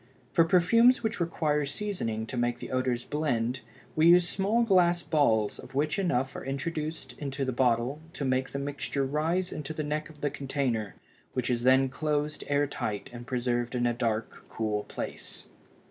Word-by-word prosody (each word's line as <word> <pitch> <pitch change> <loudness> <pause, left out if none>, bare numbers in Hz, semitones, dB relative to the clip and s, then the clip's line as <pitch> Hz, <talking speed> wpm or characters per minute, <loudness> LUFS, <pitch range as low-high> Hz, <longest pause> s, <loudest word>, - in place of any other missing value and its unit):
For 165 - +5
perfumes 230 +9 +5
which 220 -2 -1
require 155 -3 +1
seasoning 140 - -2
to 125 - -6
make 120 0 0
the - - -8
odors 130 -2 0
blend 125 -5 -1 0.3
we 155 +1 +5
use 175 0 +7
small 205 +6 +1
glass 175 -5 +4
balls 110 -9 +2
of - - -11
which 150 +5 +1
enough 135 -8 0
are - - -5
introduced 150 0 -4
into 140 -1 -2
the 130 - 0
bottle 125 +2 +1
to 140 - -3
make 130 0 +1
the - - -4
mixture 140 0 -2
rise 165 +6 0
into 150 +1 -5
the 155 - -2
neck 150 +1 -2
of 150 -2 -15
the 145 - 0
container 135 -7 -2 0.4
which 125 0 -1
is 120 -1 0
then 130 +2 +5
closed 150 +2 -1
air 145 0 +2
tight 105 -7 -4
and 120 0 -9
preserved 120 -1 -1
in 120 0 +1
a 120 - +2
dark, 115 -2 -2
cool 105 -2 -2
place. - - -6
140 Hz, 175 wpm, -29 LUFS, 120-155 Hz, 0.4 s, use